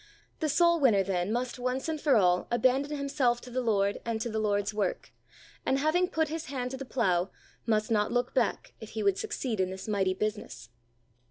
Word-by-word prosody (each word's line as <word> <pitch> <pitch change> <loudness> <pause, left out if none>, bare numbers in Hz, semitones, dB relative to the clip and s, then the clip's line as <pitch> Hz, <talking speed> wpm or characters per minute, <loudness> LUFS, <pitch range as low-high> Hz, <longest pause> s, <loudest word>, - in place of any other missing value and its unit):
The 310 - 0
soul 340 +3 +4
winner, 225 -9 +4
then, 185 0 -1
must 245 +1 -2
once 255 +3 -2
and 315 -2 -3
for 285 -4 +4
all, 180 -4 +3
abandon 265 +4 +1
himself 275 -4 +1
to 250 - -11
the 255 +1 -1
Lord 200 -4 +1
and 230 -1 -2
to 235 - -2
the 220 - -1
Lord's 205 -1 0
work, 205 -3 -2 0.5
and, 265 - +1
having 310 +6 +2
put 320 -3 0
his 320 +1 -4
hand 255 -3 -4
to 265 - -5
the 270 - -6
plow, 190 -8 +1 0.4
must 215 0 +1
not 210 -2 +2
look 245 0 0
back, - - 0
if - - -9
he - - 0
would 400 -1 +2
succeed 270 - -3
in 185 -1 +1
this 190 +2 -7
mighty 190 -3 +1
business. 210 - -4
240 Hz, 205 wpm, -29 LUFS, 205-280 Hz, 0.5 s, soul